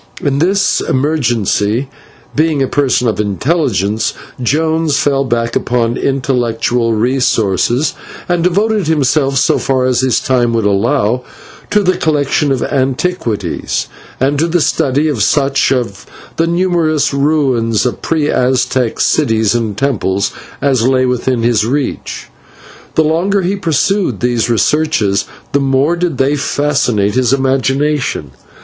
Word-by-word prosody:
In 140 -1 -1
this 195 +4 +2
emergency, 120 -4 0 0.5
being 155 -2 +1
a - - 0
person 130 -3 +1
of 110 - -1
intelligence, 110 - 0 0.3
Jones 160 +3 +1
fell 140 -1 +1
back 115 -2 -1
upon 120 -1 0
intellectual 120 -3 0
resources, 120 - +1 0.3
and 175 -2 0
devoted 205 +1 +1
himself, 140 -2 +1
so - - +2
far 130 -1 0
as 130 -1 +1
his 130 -2 +2
time 125 -3 +1
would 115 -2 0
allow, 115 +4 +1 0.5
to 210 0 +2
the 185 -1 +1
collection 145 -1 +1
of 135 - 0
antiquities, 135 - -2 0.3
and 140 +2 +1
to 165 - +2
the 175 +1 +1
study 145 -1 +1
of 140 -8 -1
such 140 +2 +2
of 120 -8 -2 0.3
the 165 - +1
numerous 170 -4 +1
ruins 135 -7 +1
of 125 - -2
pre 155 -3 0
Aztec 130 -2 0
cities 110 -7 +2
and 110 -4 -2
temples 100 -8 0 0.3
as 135 -4 +2
lay 130 -1 +2
within 125 -1 -1
his 115 -3 +2
reach. 130 +4 -3 0.7
The 160 - +4
longer 180 +6 +1
he 185 +3 0
pursued 180 - 0
these 120 -1 0
researches, 120 -5 +1 0.3
the 140 - +2
more 135 +4 +1
did 170 -5 -2
they 135 +2 +2
fascinate 135 -8 0
his 125 0 +2
imagination. 135 - 0
135 Hz, 130 wpm, -14 LUFS, 120-155 Hz, 0.7 s, The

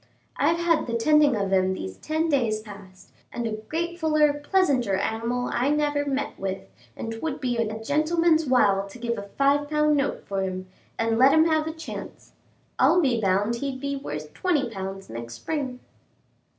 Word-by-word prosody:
I've 330 +4 +2
had 335 -3 +1
the 235 - -2
tending 295 +3 +4
of 195 -2 -1
him 190 0 +2
these 95 - -6
ten 315 +1 -1
days 240 -8 +1
past, 200 -3 -13 0.2
and 240 - -4
a 225 - -1
gratefuller, 310 +5 0
pleasanter 280 - +2
animal 230 +5 -1
I 250 +3 +1
never 295 -1 +1
met 280 +1 -2
with, 190 - -3 0.3
and 225 - -4
'twould 275 +6 -4
be 250 -4 -1
worth 225 -2 0
a 220 +1 -6
gentleman's 315 +3 +2
while 200 -6 +3
to 195 - -11
give 235 -1 -2
a 200 0 -9
five 285 +1 +2
pound 300 0 +3
note 280 0 -1
for 195 -1 -2
him, 185 -1 -3 0.3
and 225 0 0
let 265 +2 +7
him 315 0 +6
have 315 -1 +1
a - - -2
chance. 320 0 -9 0.5
I'll 350 - +5
be 255 -8 +2
bound 205 +4 +1
he'd 270 +1 -4
be 280 +1 -2
worth 150 - -6
twenty 295 -10 0
pounds 195 -1 -6
next 115 +1 -7
spring." 260 - -4
255 Hz, 180 wpm, -25 LUFS, 205-300 Hz, 0.5 s, let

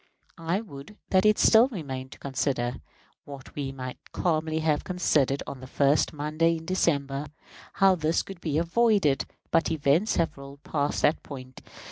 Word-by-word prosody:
I 165 +5 -1
would 155 -1 -11
that 190 +2 +4
it 215 - +4
still 225 +2 +6
remained 135 - -6
to - - -15
consider 130 -2 -2 0.5
what 140 -2 -11
we 140 -2 -4
might 130 -1 -7
calmly 160 -2 0
have 155 -2 +1
considered 150 -7 +1
on 135 - -7
the 130 - -10
first 140 +3 +2
Monday 155 +3 0
in 160 - -10
December 145 -5 0 0.5
how 195 -1 +5
this 160 -2 0
could 195 -3 -10
be 155 -3 -1
avoided; 170 -3 +2 0.3
but 165 - +2
events 160 +6 +2
have 165 -2 0
rolled 140 +1 -11
past 145 -1 -1
that 150 - +3
point. 130 -2 -10
155 Hz, 160 wpm, -27 LUFS, 140-170 Hz, 0.5 s, still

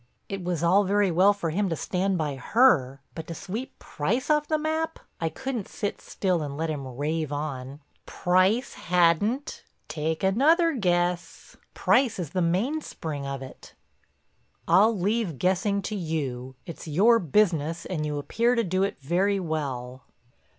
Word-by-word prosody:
It 195 -2 -5
was 175 -2 -2
all 185 +4 +5
very 200 0 +2
well 185 +4 +5
for 195 -6 -3
him 195 +4 0
to 165 - -1
stand 185 +3 -1
by 150 -4 -2
her, 135 - +3
but 160 -1 -7
to 165 - -6
sweep 220 +11 -6
Price 235 - -2
off 300 0 +2
the 310 - +1
map! 315 +1 -2 0.2
I 165 - 0
couldn't 245 +3 -4
sit 205 - -4
still 185 -4 -1
and 145 -2 -5
let 160 0 -1
him 135 -4 -6
rave 155 +1 -2
on. 145 -1 -5 0.3
"Price 185 +8 +2
hadn't? 180 - +1 0.2
Take 160 +2 -3
another 315 - +4
guess. 175 -6 -1 0.2
Price 250 -4 +2
is 170 -6 -4
the 185 - 0
mainspring 170 - -2
of 135 -1 -4
it." 130 - -13 0.9
"I'll 215 +2 +5
leave 200 - -1
guessing 195 - +1
to 215 - -3
you—it's 140 -4 -5
your 210 +10 +4
business, 165 -3 +1
and 165 -5 -3
you 150 -1 -2
appear 235 +11 +1
to 230 - +2
do 185 -1 0
it 195 - 0
very 190 +7 +1
well." 135 -7 -4
180 Hz, 155 wpm, -26 LUFS, 155-210 Hz, 0.9 s, all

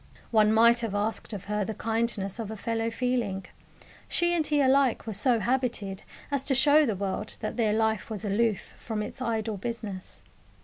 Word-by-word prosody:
One 215 -2 +5
might 235 +2 +6
have 225 -4 -3
asked 210 +3 -2
of 200 -3 -6
her 210 0 -1
the 220 +2 -4
kindness 225 -2 -1
of 220 -3 -4
a 220 - -5
fellow 225 +2 -1
feeling. 230 -6 -1 0.6
She 345 0 +1
and 320 -3 +1
he 295 -1 +2
alike 270 -2 +3
were 220 - -4
so 235 +4 +2
habited 225 -4 -1 0.3
as 280 -2 0
to 270 - +2
show 295 +2 +5
the 220 - 0
world 200 +2 -3
that - - -3
their 220 -3 +2
life 220 -1 0
was 215 -1 -5
aloof 210 0 0
from 215 -2 -3
its 235 +5 -7
"idle 225 -3 -1
business." 215 -3 -6
225 Hz, 185 wpm, -28 LUFS, 210-245 Hz, 0.6 s, might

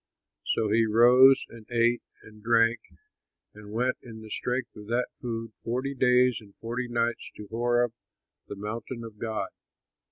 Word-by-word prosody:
So 110 -2 +1
he 115 +1 +3
rose 125 +4 +6
and 115 -2 -13
ate 120 0 +2 0.2
and 110 0 -15
drank 115 +1 +3 0.7
and 105 0 -12
went 125 +4 0
in 110 -2 -11
the 110 - -11
strength 125 -1 -3
of 105 -1 -11
that 120 +2 0
food 115 -2 -4
forty 130 +4 -2
days 125 -2 +3
and 100 -2 -17
forty 120 +2 -4
nights 120 0 -1
to 105 - -9
Horeb 120 0 +1 0.5
the - - -6
mountain 110 +4 -6
of 110 -2 -10
God. 110 -4 -3
115 Hz, 155 wpm, -27 LUFS, 110-120 Hz, 0.7 s, rose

